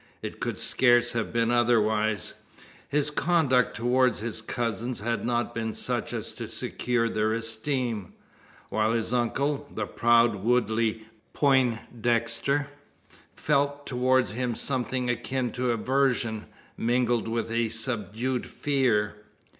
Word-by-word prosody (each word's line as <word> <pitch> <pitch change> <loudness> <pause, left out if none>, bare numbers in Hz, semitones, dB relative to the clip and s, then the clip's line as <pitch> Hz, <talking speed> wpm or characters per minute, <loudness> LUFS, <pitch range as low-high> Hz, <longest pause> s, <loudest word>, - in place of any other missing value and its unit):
It - - -6
could - - -2
scarce 120 -1 +3
have 115 -2 -2
been 115 0 +1
otherwise. 110 -3 +2 0.6
His 150 0 +1
conduct 150 -7 +2
towards 125 0 +2
his 110 0 -4
cousins 115 +1 -3
had 115 -1 -1
not 120 0 -1
been 110 -1 -3
such - - -2
as - - -4
to - - -6
secure 125 -2 -1
their 110 -1 0
esteem; 115 -2 -2 0.6
while 110 +1 +1
his 115 +1 -1
uncle, 140 +4 0
the 110 - -3
proud 115 0 +3
Woodley 110 0 +1 0.3
Poindexter, 120 0 +1 0.7
felt 145 -1 0
towards 130 -1 +2
him 120 +1 -2
something 130 -1 -2
akin 120 +1 -1
to 125 +2 -1
aversion, 120 -2 0 0.3
mingled 120 -1 +1
with 115 0 -2
a 115 -1 +1
subdued 115 +2 -2
fear. 120 -8 0
120 Hz, 120 wpm, -27 LUFS, 115-130 Hz, 0.7 s, scarce